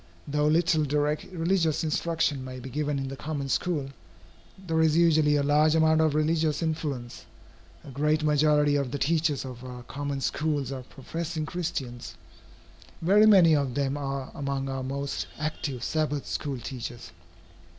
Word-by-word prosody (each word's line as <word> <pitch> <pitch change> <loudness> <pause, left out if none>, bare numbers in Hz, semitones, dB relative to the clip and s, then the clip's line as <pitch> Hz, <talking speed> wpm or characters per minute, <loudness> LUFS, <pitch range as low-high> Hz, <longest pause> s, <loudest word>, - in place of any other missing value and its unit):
Though 150 +1 +1
little 160 0 +3
direct 150 +1 0
religious 170 -3 0
instruction 160 -3 0
may 130 0 -7
be 130 +1 -8
given 150 0 -1
in 135 0 -3
the 135 - -6
common 140 -1 -4
school, 145 -3 -1 0.7
there 165 -4 -1
is 160 0 +3
usually 155 -3 +4
a 145 - +2
large 150 +2 +4
amount 160 0 +4
of 155 -2 +2
religious 155 0 +1
influence. 145 -7 -4 0.6
A 140 - -10
great 150 +3 +1
majority 150 -1 +3
of 140 -3 -1
the 145 - -3
teachers 155 -1 +1
of 125 -1 -8
our 125 -1 -8
common 140 +2 -4
schools 145 -2 -1
are 135 -1 -4
professing 160 +5 -5
Christians. 150 -8 -4 0.9
Very 205 +5 +6
many 180 -7 +7
of 140 -4 -1
them 140 -1 0
are 135 -2 -4
among 140 -2 -3
our 135 0 -3
most 140 +2 -3
active 145 -4 -3
Sabbath 150 -2 -1
school 140 -3 -3
teachers. 120 -6 -7
150 Hz, 155 wpm, -27 LUFS, 135-160 Hz, 0.9 s, many